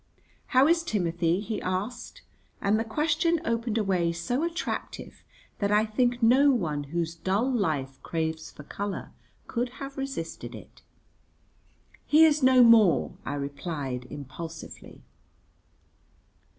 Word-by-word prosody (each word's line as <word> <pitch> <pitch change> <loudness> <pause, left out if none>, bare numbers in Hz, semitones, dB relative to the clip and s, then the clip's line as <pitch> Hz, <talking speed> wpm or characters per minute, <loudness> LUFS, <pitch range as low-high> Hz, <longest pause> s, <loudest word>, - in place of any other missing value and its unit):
"How 260 +1 +5
is 335 +1 +3
Timothy?" 175 - 0
he 215 0 -4
asked; 200 +6 -4 0.4
and 205 +2 +2
the - - 0
question 310 +7 +1
opened 230 -2 -1
a 220 - +2
way 180 -4 +1
so 170 - -2
attractive 340 +1 -4 0.4
that 200 0 0
I 210 +1 +4
think 240 +2 0
no 260 +5 +6
one 155 - 0
whose 165 +2 -2
dull 190 +8 0
life 145 - -1
craves 160 -1 -3
for 150 - -12
colour 200 +6 -5 0.3
could 245 0 -3
have 275 0 -7
resisted 270 -12 -5
it. - - -14 1.3
"He 310 +2 +7
is 305 -1 +3
no 260 -1 +6
more," 225 -7 +5
I 145 - -2
replied 140 -3 -4
impulsively. 150 +4 -9
210 Hz, 125 wpm, -27 LUFS, 165-255 Hz, 1.3 s, He